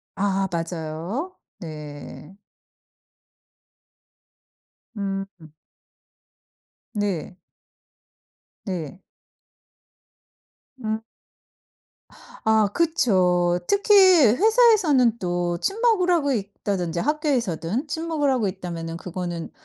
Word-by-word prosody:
아 195 -1 0
맞아요. 170 - -4 0.2
네. 150 +1 -9 2.6
음. 195 -1 -2 1.7
네. 200 -4 -2 1.3
네. 180 -3 -5 1.8
음. 220 0 -2 1.4
아 220 -2 +3
그쵸. 180 - +2
특히 405 +1 +2
회사에서는 370 - +5
또 175 -1 -1
친목을 425 - +1
하고 295 -6 +2
있다든지 195 -5 -3
학교에서든 255 - -1
친목을 315 -2 -1
하고 240 -6 +1
있다면은 170 -3 -5
그거는 175 -2 -5
200 Hz, 140 characters per minute, -23 LUFS, -, 2.6 s, 회사에서는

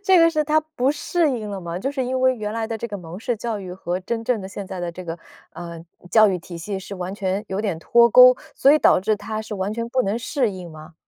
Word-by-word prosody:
这 380 -2 +5
个 330 0 +6
是 310 -2 +1
她 305 +1 +3
不 305 -4 -1
适 305 +1 0
应 220 -5 -4
了 200 -1 -5
吗？ 170 0 -5
就 265 +9 -2
是 270 - -1
因 255 +1 -1
为 260 0 +4
原 210 -1 -4
来 225 0 -2
的 225 0 -3
这 235 +2 -5
个 205 - -5
蒙 175 0 -9
氏 235 0 -1
教 225 -1 -4
育 185 -2 -7
和 180 0 -3
真 225 +4 -4
正 240 -3 0
的 190 - -7
现 200 0 -7
在 185 -1 -6
的 175 - -3
这 180 +2 -9
个， 165 0 -5 0.3
呃， 170 -1 -8 0.3
教 220 -1 +7
育 185 -2 -1
体 170 0 -10
系 190 +4 -4
是 190 +1 -8
完 185 0 -5
全 195 0 -2
有 190 +1 -2
点 200 -7 -2
脱 235 +7 +5
钩， 250 +2 +8 0.2
所 275 - +5
以 305 - +5
导 - - +5
致 215 +3 +1
她 215 +1 -5
是 220 - -6
完 195 +1 -2
全 230 +1 -3
不 255 +2 +1
能 210 +1 -1
适 250 -1 0
应 180 -3 -8
吗？ 155 +2 -12
210 Hz, 305 characters per minute, -22 LUFS, 185-245 Hz, 0.3 s, 钩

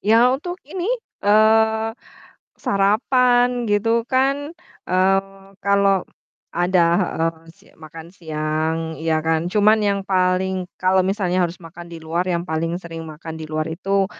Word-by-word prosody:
Ya 230 +4 +4
untuk 350 +7 -4
ini, 355 +6 -4 0.3
eee, 220 +1 +3 0.7
sarapan 245 +4 +2
gitu 225 +3 +1
kan, 275 +4 0 0.3
eee, 195 +1 0
kalau 200 -1 +2 0.5
ada 175 0 +3 0.2
heeh, 165 -2 -1 0.2
si - - -26
makan 160 +1 -11
siang 155 -2 -2 0.2
ya 160 -1 +1
kan. 160 +1 0
Cuman 215 +1 +4
yang 200 -1 +1
paling 185 -1 0
kalau 185 0 +3
misalnya 185 -2 0
harus 175 +1 -3
makan 170 +1 -11
di 170 - -7
luar, 165 +2 -2
yang 170 0 -1
paling 165 +2 -1
sering 165 -2 -8
makan 160 +1 -8
di 155 - -5
luar 155 0 -1
itu 195 +4 0
190 Hz, 135 wpm, -21 LUFS, 165-220 Hz, 0.7 s, Ya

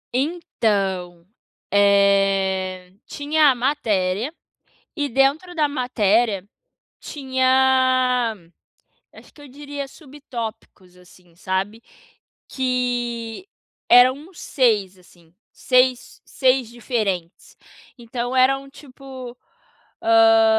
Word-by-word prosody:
Então, 200 - -2 0.5
eh, 195 -2 +2
tinha 295 +1 +2
a 260 - +2
matéria 230 -3 -1 0.6
e 290 -2 -1
dentro 280 +7 +1
da 305 -3 +1
matéria 230 -6 0 0.6
tinha 260 -3 +1 0.8
acho - - -17
que 290 - -16
eu 285 - -13
diria 285 +1 -7
subtópicos 235 - -9
assim, 180 -1 -21
sabe? 195 +4 -3 0.7
Que 245 - -3 0.4
eram 250 +2 +7
uns 325 +5 -14
6 210 -8 0
assim, 175 -2 -23 0.2
seis 255 -1 +1
seis 260 -2 +1
diferentes, 215 -8 -4 0.4
então 240 +1 -5
eram 270 +1 +2
tipo, 260 -3 -11 0.7
hã, 225 0 +5
245 Hz, 85 wpm, -21 LUFS, 200-265 Hz, 0.8 s, eram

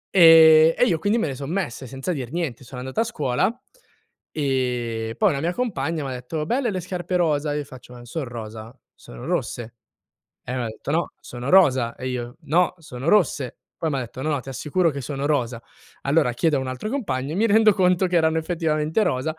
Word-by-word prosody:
Ehm, 160 -2 +8
e 245 - +4
io 165 -7 +1
quindi 205 +6 +1
me 220 - +1
le 140 - -3
son 140 +2 -6
messe 150 -8 -3
senza 135 +7 -4
dir 130 -3 -5
niente. 160 -8 -3
Sono 125 +1 -8
andato 130 +9 -4
a 225 - +4
scuola, 190 - -1 0.7
e 125 -5 -2
poi 210 - +4
una 140 - -2
mia 170 +4 -1
compagna 165 - -2
m'ha 135 - -4
detto: 130 +5 -4
"Belle 245 - 0
le 185 -3 -3
scarpe 180 0 -4
rosa." 150 -4 +1
Io 150 - -2
faccio: 130 -2 -13
"Ma - - -11
non 120 - -12
son 150 +2 -4
rosa, 115 0 -8 0.2
sono - - -12
rosse." 120 -1 -3 0.7
E 125 - -4
m'ha 120 -2 -2
detto: 110 +5 -7
"No, 165 +3 0
sono 120 +2 -7
rosa." 130 -11 +4
E 130 - -5
io: 120 -1 -5
"No, 165 +5 +2
sono 135 -2 -7
rosse." 160 - +2 0.2
Poi 160 - -2
m'ha 135 -2 -1
detto: 125 +1 -7
"No, 155 - -1
no 145 -3 0
ti 135 - -13
assicuro 155 +6 0
che 140 -1 -5
sono 140 +2 -3
rosa." 120 -5 -1 0.4
Allora 140 -3 +2
chiedo 150 +4 +1
a - - 0
un 130 - -4
altro 130 +11 -4
compagno, 140 - -2
e - - -3
mi 220 +4 +3
rendo 220 0 +5
conto 185 -1 +2
che 180 - +1
erano 160 0 +3
effettivamente 160 +1 0
rosa. 155 +5 -1
145 Hz, 215 wpm, -23 LUFS, 125-170 Hz, 0.7 s, Ehm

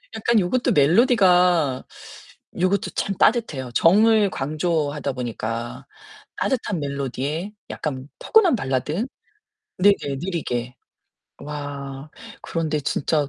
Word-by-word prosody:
약간 225 0 +2
요것도 220 +7 +1
멜로디가 180 - +4 0.8
요것도 185 +2 +1
참 195 - -2
따뜻해요. 150 - +1
정을 210 - +5
강조하다 150 -1 -1
보니까 115 -1 -5 0.5
따뜻한 220 -8 -1
멜로디에 140 - -3 0.2
약간 135 -2 -5
포근한 395 - +4
발라드. 150 - -1 0.7
네네 185 -8 +3
느리게. 125 -9 -3 0.6
와 140 -1 -7 0.3
그런데 160 -2 -2
진짜 145 +1 0
155 Hz, 235 characters per minute, -23 LUFS, 135-195 Hz, 0.8 s, 정을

